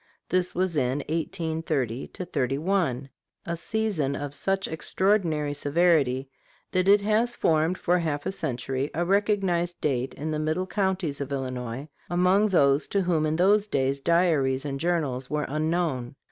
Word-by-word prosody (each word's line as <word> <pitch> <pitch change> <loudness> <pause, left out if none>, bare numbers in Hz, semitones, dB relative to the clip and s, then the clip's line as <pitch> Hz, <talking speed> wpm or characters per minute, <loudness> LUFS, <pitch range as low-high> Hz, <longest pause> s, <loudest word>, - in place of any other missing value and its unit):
This 180 0 0
was 180 -1 0
in 135 0 0
1830 160 - -2
31, 145 -3 -1 0.4
a 170 - -2
season 170 -7 -1
of 145 0 -5
such 195 +7 0
extraordinary 160 -2 0
severity 145 -3 +2 0.4
that 185 0 +1
it 200 +1 +6
has 220 +4 +1
formed 160 +3 +2
for 180 +1 +1
half 150 -4 -2
a - - -1
century 135 -4 -2
a 175 +2 0
recognized 190 -3 +1
date 130 -3 -1
in 155 +2 -4
the 155 - -1
middle 155 +4 -1
counties 190 -7 -1
of 140 0 -4
Illinois, 130 0 -4 0.2
among 180 +4 +3
those 140 -7 +3
to 200 - +1
whom 165 -3 +1
in 155 - 0
those 200 +4 +3
days 135 -5 0
diaries 150 -4 +2
and 135 -1 -3
journals 145 -7 -1
were 150 0 -1
unknown. 155 -4 -1
160 Hz, 145 wpm, -26 LUFS, 140-180 Hz, 0.4 s, it